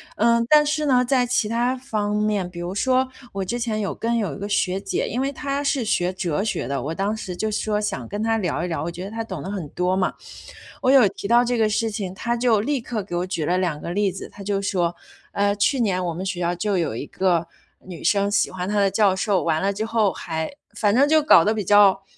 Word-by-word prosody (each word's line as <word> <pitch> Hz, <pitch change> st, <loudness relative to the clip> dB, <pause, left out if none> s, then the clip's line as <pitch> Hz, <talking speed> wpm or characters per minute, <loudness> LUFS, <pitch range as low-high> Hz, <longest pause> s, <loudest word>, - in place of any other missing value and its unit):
呃， 235 Hz, +1 st, +3 dB
但 300 Hz, 0 st, +6 dB
是 305 Hz, +1 st, 0 dB
呢， 255 Hz, -3 st, +4 dB
在 250 Hz, 0 st, +2 dB
其 240 Hz, -3 st, 0 dB
他 240 Hz, +2 st, +1 dB
方 215 Hz, -6 st, -2 dB
面， 210 Hz, -4 st, 0 dB
比 175 Hz, -, -9 dB
如 175 Hz, +2 st, -4 dB
说， 255 Hz, +5 st, +2 dB, 0.3 s
我 195 Hz, 0 st, -2 dB
之 240 Hz, +6 st, -3 dB
前 220 Hz, -3 st, -1 dB
有 195 Hz, -, -2 dB
跟 235 Hz, +1 st, -1 dB
有 200 Hz, -9 st, -1 dB
1 -, -, -9 dB
个 200 Hz, -, -4 dB
学 195 Hz, -2 st, 0 dB
姐， -, -, -2 dB
因 240 Hz, -, -2 dB
为 270 Hz, -, 0 dB
她 280 Hz, 0 st, -3 dB
是 275 Hz, -2 st, 0 dB
学 180 Hz, -4 st, 0 dB
哲 180 Hz, -2 st, -2 dB
学 220 Hz, -, -2 dB
的， 140 Hz, -2 st, -1 dB
我 155 Hz, +4 st, -3 dB
当 200 Hz, +4 st, -1 dB
时 185 Hz, -4 st, -6 dB
就 215 Hz, +4 st, -2 dB
是 210 Hz, -, -1 dB
说 210 Hz, -1 st, 0 dB
想 210 Hz, -1 st, -3 dB
跟 205 Hz, +2 st, -4 dB
她 225 Hz, 0 st, +1 dB
聊 170 Hz, -5 st, -1 dB
一 180 Hz, -, -2 dB
聊， 165 Hz, -, -2 dB
我 165 Hz, -, -3 dB
觉 175 Hz, +2 st, -7 dB
得 200 Hz, -, -7 dB
她 225 Hz, -, -4 dB
懂 185 Hz, -9 st, -6 dB
的 190 Hz, -, -5 dB
很 185 Hz, -7 st, -4 dB
多 180 Hz, +4 st, -1 dB
嘛， 185 Hz, -, 0 dB, 0.7 s
我 260 Hz, -, +2 dB
有 265 Hz, -5 st, +7 dB
提 200 Hz, -, -7 dB
到 240 Hz, +3 st, +5 dB
这 245 Hz, 0 st, 0 dB
个 220 Hz, -1 st, +3 dB
事 220 Hz, +1 st, 0 dB
情， 200 Hz, -4 st, -4 dB
她 235 Hz, +3 st, -2 dB
就 230 Hz, -4 st, +3 dB
立 285 Hz, +3 st, -1 dB
刻 225 Hz, -3 st, -4 dB
给 180 Hz, -2 st, -6 dB
我 180 Hz, -, -2 dB
举 170 Hz, -5 st, -2 dB
了 180 Hz, +4 st, +1 dB
2 170 Hz, -5 st, -1 dB
个 170 Hz, -, -5 dB
例 200 Hz, +1 st, +1 dB
子。 190 Hz, -, -8 dB
她 205 Hz, -, -13 dB
就 200 Hz, 0 st, -1 dB
说， 175 Hz, -3 st, 0 dB, 0.4 s
呃， 200 Hz, 0 st, +2 dB
去 250 Hz, +5 st, +1 dB
年 185 Hz, -4 st, 0 dB
我 170 Hz, -, -2 dB
们 180 Hz, +4 st, -5 dB
学 185 Hz, -2 st, -3 dB
校 175 Hz, +1 st, 0 dB
就 200 Hz, +2 st, -1 dB
有 165 Hz, -10 st, -1 dB
一 130 Hz, -, -4 dB
个 175 Hz, -3 st, 0 dB, 0.4 s
女 180 Hz, -3 st, -9 dB
生， 200 Hz, 0 st, +2 dB
喜 205 Hz, -, +2 dB
欢 185 Hz, 0 st, -4 dB
他 210 Hz, 0 st, +1 dB
的 200 Hz, -1 st, +3 dB
教 200 Hz, 0 st, +3 dB
授， 190 Hz, -1 st, +1 dB
完 160 Hz, 0 st, +1 dB
了 200 Hz, +1 st, +1 dB
之 215 Hz, +2 st, -3 dB
后 225 Hz, -3 st, +1 dB
还 160 Hz, -1 st, -4 dB, 0.3 s
反 205 Hz, -1 st, +2 dB
正 275 Hz, +3 st, +5 dB
就 315 Hz, 0 st, +5 dB
搞 230 Hz, -, +6 dB
得 215 Hz, -, +2 dB
比 215 Hz, -2 st, -2 dB
较 200 Hz, -1 st, +5 dB
205 Hz, 280 characters per minute, -23 LUFS, 185-230 Hz, 0.7 s, 有